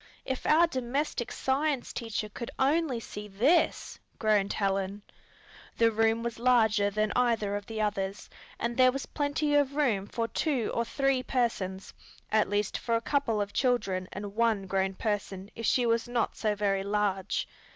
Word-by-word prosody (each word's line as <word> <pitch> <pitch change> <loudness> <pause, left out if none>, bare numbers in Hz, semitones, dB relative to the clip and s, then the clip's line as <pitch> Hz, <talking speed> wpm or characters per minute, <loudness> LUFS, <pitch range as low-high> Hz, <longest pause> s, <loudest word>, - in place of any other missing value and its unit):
"If 260 -1 -3
our 325 +3 +6
domestic 260 -3 -2
science 275 0 -1
teacher 225 -2 -3
could 230 +3 -7
only 280 -2 +2
see 210 -2 -8
this!" 240 - +1 0.2
groaned 210 -2 +2
Helen. 195 0 -1 0.7
The 230 -1 +4
room 225 +1 +2
was 235 -1 -4
larger 220 -4 +3
than 215 +1 0
either 230 -5 +1
of 205 0 -5
the 220 -1 -3
others, 200 -2 -2 0.3
and 235 0 -2
there 255 -1 +6
was 275 +1 -4
plenty 290 0 -1
of 285 -1 +2
room 225 -10 +1
for 230 +1 -2
two 265 -4 -1
or 235 - 0
three 270 +2 +1
persons, 215 -7 -2 0.4
at 215 -2 +3
least 205 0 -1
for 230 - 0
a - - +2
couple 235 -3 0
of 205 0 -2
children 195 -8 0
and 200 0 -6
one 225 -4 +2
grown 190 0 0
person 200 -2 -3
if 230 - -3
she 245 - +3
was 230 0 +1
not 240 -2 -1
so 215 -2 0
very 200 -1 +1
large. 200 -1 -1
225 Hz, 165 wpm, -29 LUFS, 205-255 Hz, 0.7 s, our